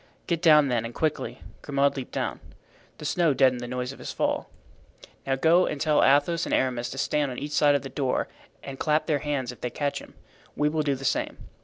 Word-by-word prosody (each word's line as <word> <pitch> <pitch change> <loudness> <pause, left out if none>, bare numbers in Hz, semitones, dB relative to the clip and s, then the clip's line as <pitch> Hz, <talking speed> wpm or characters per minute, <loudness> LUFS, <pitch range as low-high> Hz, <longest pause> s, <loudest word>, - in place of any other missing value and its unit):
"Get 170 -2 -1
down 150 -4 +6
then 120 -2 0
and 115 0 -7
quickly." 155 -2 -2 0.2
Grimaud 140 0 +1
leaped 135 -3 -6
down. - - -3 0.6
The - - -9
snow 160 -2 +2
deadened 130 -2 +3
the 120 - -5
noise 125 +1 -3
of 135 - -12
his - - -6
fall. - - -1 0.8
"Now 135 - +2
go 165 +6 +4
and 145 - -3
tell 150 0 +3
Athos 145 +5 +3
and - - +1
Aramis 125 -2 0
to 135 - -7
stand 145 +1 0
on 125 - -6
each 145 +1 -5
side 145 -1 +4
of 140 - -1
the - - -5
door 135 0 -1 0.4
and 135 -1 -8
clap 155 0 +1
their 150 -3 +1
hands 140 -4 -2
if 125 - -14
they 125 - -2
catch 145 +4 -2
him. - - -14 0.4
We 150 0 +2
will 155 +1 0
do 145 -2 0
the 135 +1 -8
same." - - -1
140 Hz, 225 wpm, -26 LUFS, 130-150 Hz, 0.8 s, down